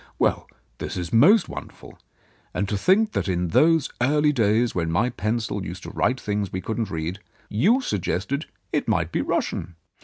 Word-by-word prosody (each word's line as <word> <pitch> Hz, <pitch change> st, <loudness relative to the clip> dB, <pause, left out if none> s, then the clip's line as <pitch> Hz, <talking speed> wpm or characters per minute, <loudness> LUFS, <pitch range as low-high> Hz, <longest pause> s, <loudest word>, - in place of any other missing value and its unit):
"Well, -, -, 0 dB, 0.3 s
that -, -, -4 dB
is 90 Hz, -2 st, -4 dB
most 175 Hz, -, +6 dB
wonderful. -, -, -10 dB, 0.6 s
And 100 Hz, -, 0 dB
to 105 Hz, -, 0 dB
think 200 Hz, -, +3 dB
that 90 Hz, -, -2 dB
in 90 Hz, -2 st, 0 dB
those 160 Hz, -, +3 dB
early 150 Hz, +3 st, +3 dB
days, 115 Hz, -1 st, +2 dB
when 85 Hz, -2 st, -1 dB
my 100 Hz, +10 st, +1 dB
pencil 110 Hz, -2 st, -2 dB
used 90 Hz, +2 st, -7 dB
to -, -, -7 dB
write 125 Hz, +1 st, 0 dB
things 105 Hz, -2 st, -2 dB
we 95 Hz, -, -3 dB
couldn't 110 Hz, +3 st, -3 dB
read, 80 Hz, +4 st, -4 dB, 0.3 s
you 205 Hz, -, +3 dB
suggested 105 Hz, -, -2 dB, 0.3 s
it -, -, 0 dB
might -, -, +1 dB
be -, -, 0 dB
Russian 85 Hz, +1 st, -2 dB
110 Hz, 175 wpm, -24 LUFS, 95-140 Hz, 0.6 s, most